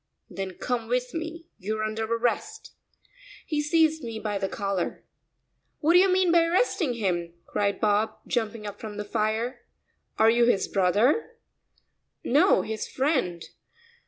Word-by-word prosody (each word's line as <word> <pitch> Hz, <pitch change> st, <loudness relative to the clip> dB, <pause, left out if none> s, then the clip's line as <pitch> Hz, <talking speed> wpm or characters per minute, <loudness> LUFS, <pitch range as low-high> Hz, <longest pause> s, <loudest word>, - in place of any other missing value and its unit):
"Then 190 Hz, -2 st, -5 dB
come 240 Hz, -2 st, -2 dB
with 250 Hz, +1 st, -1 dB
me, 330 Hz, 0 st, -5 dB
you're 215 Hz, +3 st, -2 dB
under 215 Hz, +1 st, -2 dB
arrest." 240 Hz, -, -2 dB, 0.7 s
He 300 Hz, -2 st, -1 dB
seized 315 Hz, 0 st, +2 dB
me 230 Hz, -2 st, -5 dB
by 210 Hz, -2 st, -3 dB
the 195 Hz, 0 st, -2 dB
collar. 195 Hz, -3 st, -3 dB, 0.7 s
"What 320 Hz, +2 st, +2 dB
do 355 Hz, -, +8 dB
you 385 Hz, +1 st, +5 dB
mean 370 Hz, -1 st, +3 dB
by 340 Hz, -1 st, +5 dB
arresting 340 Hz, -, +1 dB
him?" 175 Hz, -6 st, -2 dB
cried 200 Hz, -1 st, -1 dB
Bob, 210 Hz, +1 st, +1 dB
jumping 225 Hz, -3 st, -2 dB
up 205 Hz, 0 st, -7 dB
from 215 Hz, -2 st, -7 dB
the 210 Hz, -, -4 dB
fire. 225 Hz, +3 st, -1 dB, 0.5 s
"Are 220 Hz, +1 st, +6 dB
you 235 Hz, +1 st, +4 dB
his 220 Hz, -5 st, +2 dB
brother?" 205 Hz, -, +2 dB, 0.9 s
"No, 305 Hz, +10 st, +4 dB
his 220 Hz, 0 st, -4 dB
friend." 260 Hz, -, -1 dB
230 Hz, 145 wpm, -26 LUFS, 205-300 Hz, 0.9 s, do